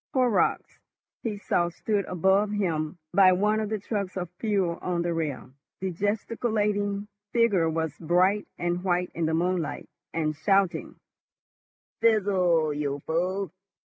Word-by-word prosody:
Horrocks, 250 -5 +1 0.4
he 215 -3 -3
saw, 175 -3 +1
stood 200 +3 -1
above 190 +4 +2
him 170 -6 -1 0.2
by 185 -1 +7
one 210 +4 +2
of 215 -1 -2
the 215 - -1
trucks 200 -2 -3
of 180 -2 -4
fuel 195 -6 0
on 175 -1 -1
the 170 0 -1
rail. 145 -7 -3 0.3
The 190 0 -2
gesticulating 205 +1 -1 0.3
figure 205 -9 +3
was 160 -2 -2
bright 180 +5 +2
and 175 +1 -1
white 180 -1 0
in 165 -1 -1
the 160 - +1
moonlight, 175 -1 -1 0.2
and 155 -2 -1
shouting, 195 +3 +1 1.1
"Fizzle, 185 -8 +3
you 145 -1 -2
fool! 180 +3 -1
185 Hz, 135 wpm, -27 LUFS, 170-205 Hz, 1.1 s, by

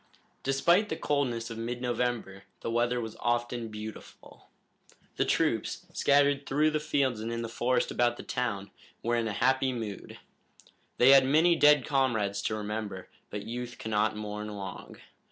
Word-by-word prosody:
Despite 170 +10 +3
the - - -1
coldness 125 -7 -1
of 115 - -6
mid 120 +2 -3
November 120 -5 -2 0.2
the 115 - -3
weather 120 +1 +1
was 110 -2 -5
often 120 0 -1
beautiful. 110 0 -10 0.7
The - - +2
troops, - - 0
scattered 140 0 +3
through 150 +3 +2
the 155 - 0
fields 140 -6 0
and 115 +2 -4
in 115 0 -3
the - - -3
forest 120 +2 0
about 120 0 +1
the - - -8
town, 105 -6 -3 0.3
were 120 +1 +1
in 115 -1 0
a - - -2
happy 130 +4 +2
mood. 110 -5 -6 0.8
They 125 +2 +7
had 135 -1 +8
many 160 +6 +4
dead 150 -4 +5
comrades 110 -8 +1
to 110 - 0
remember, 105 -3 -5 0.2
but 105 -1 -5
youth 120 +1 -5
cannot 110 0 0
mourn 105 0 -5
long. 100 -3 -7
120 Hz, 160 wpm, -29 LUFS, 110-135 Hz, 0.8 s, had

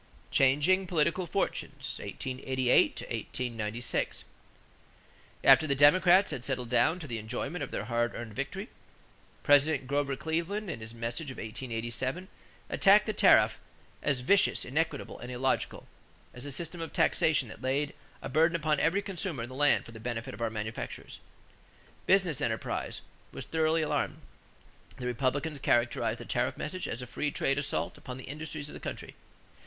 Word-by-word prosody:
=Changing 150 +8 +3
Political 170 +2 +1
Fortunes - - -3
(1888 130 -1 +1 0.3
96).= 115 -1 -2 1.2
After 160 - +7
the 140 - +1
Democrats 180 +7 +6
had 130 -5 -4
settled 125 -3 -2
down 125 +8 +3
to 170 - -8
the 120 -5 -4
enjoyment 135 +9 -4
of 135 - -5
their - - -4
hard 120 +1 0
earned 115 -2 -6
victory, 140 - -4 0.7
President 145 -2 +4 0.3
Cleveland 170 +6 -2
in 115 - -6
his 110 +1 -8
message 120 +6 -4
of 130 - -8
1887 120 - -4 0.4
attacked 205 +1 +5
the 215 - -1
tariff - - +5 0.4
as 140 -4 0
"vicious, 195 +10 +3
inequitable, 150 +2 -2
and 125 - -7
illogical"; 130 +1 -1 0.5
as 125 +3 -8
a - - -4
system 170 +4 -2
of 165 - -5
taxation 145 -5 +2
that - - -11
laid 140 +3 0 0.3
a - - -3
burden 165 +3 +3
upon 155 -3 +1
"every 180 +7 +2
consumer 175 - -3
in 120 - -6
the - - -9
land 145 +2 +3
for - - -11
the 115 - -10
benefit 120 +2 -4
of - - -9
our 115 - +1
manufacturers." 110 0 -6 0.9
Business 180 -7 +3
enterprise 110 -3 -2 0.3
was - - -7
thoroughly 160 0 +1
alarmed. 155 - -1 0.8
The 125 - -6
Republicans 140 +5 -1
characterized 120 -2 +1
the - - -8
tariff - - -1
message 185 +5 -4
as 120 +2 -4
a - - -5
free 150 +5 -2
trade 135 -1 +1
assault 145 0 -2
upon 125 0 -7
the 130 - -9
industries 150 0 -6
of - - -11
the - - -8
country. - - -6
140 Hz, 155 wpm, -30 LUFS, 125-160 Hz, 1.2 s, After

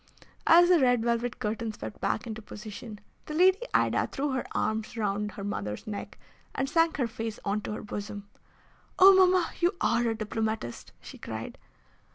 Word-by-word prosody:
As 345 +1 +8
the 355 -2 +6
red 245 -4 +3
velvet 235 0 0
curtains 220 0 -3
swept - - -8
back 220 - -1
into 220 -1 -6
position, 215 +1 -9 0.3
the 305 - -5
Lady 370 +4 +5
Ida - - +2
threw 285 +1 -2
her 260 -1 -1
arms 220 +2 -2
round 210 -1 -1
her 200 - -7
mother's 105 - -4
neck 210 -2 -6 0.4
and 270 - 0
sank 330 +1 +2
her 260 - +1
face 225 -1 -5
on 205 +1 0
to 210 - -5
her - - -6
bosom. 205 -1 -6 0.7
"Oh! 390 0 +9
mamma, 370 -1 +4
you 350 +2 +2
are 235 +1 +2
a 225 - -1
diplomatist!" 220 - -3
she - - -11
cried. - - -7
225 Hz, 175 wpm, -28 LUFS, 210-290 Hz, 0.7 s, Oh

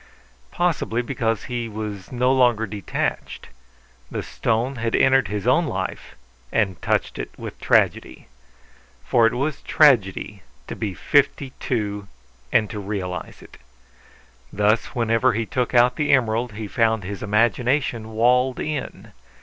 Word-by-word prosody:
Possibly 150 -9 -1
because 115 -4 -1
he 120 -3 -4
was 105 -3 -6
no 125 +1 +2
longer 120 -4 +3
detached; 100 -2 -4 0.6
the - - -4
stone 120 +4 -1
had 115 0 -1
entered 130 -4 +4
his 105 +1 -4
own 160 +7 +3
life 95 -7 -5 0.4
and 95 -5 0
touched - - -1
it - - -4
with - - -8
tragedy. - - +1 0.8
For 115 -2 +4
it 115 - -1
was 140 +3 -2
tragedy 105 - +2 0.2
to - - -6
be 100 -4 -4
fifty 140 +1 +1
two 105 -4 -3 0.4
and 110 -2 +3
to 105 - -5
realize 95 -3 -5
it. - - -16 0.9
Thus 105 +2 +2
whenever 115 +1 +2
he 115 +1 -1
took 125 +2 -2
out 125 +1 +4
the 150 - +1
emerald 120 -2 +1
he 110 0 -6
found 110 -1 +1
his 100 +2 -6
imagination 115 +2 +1
walled 125 +3 +2
in. 150 -3 -5
115 Hz, 135 wpm, -22 LUFS, 105-125 Hz, 0.9 s, entered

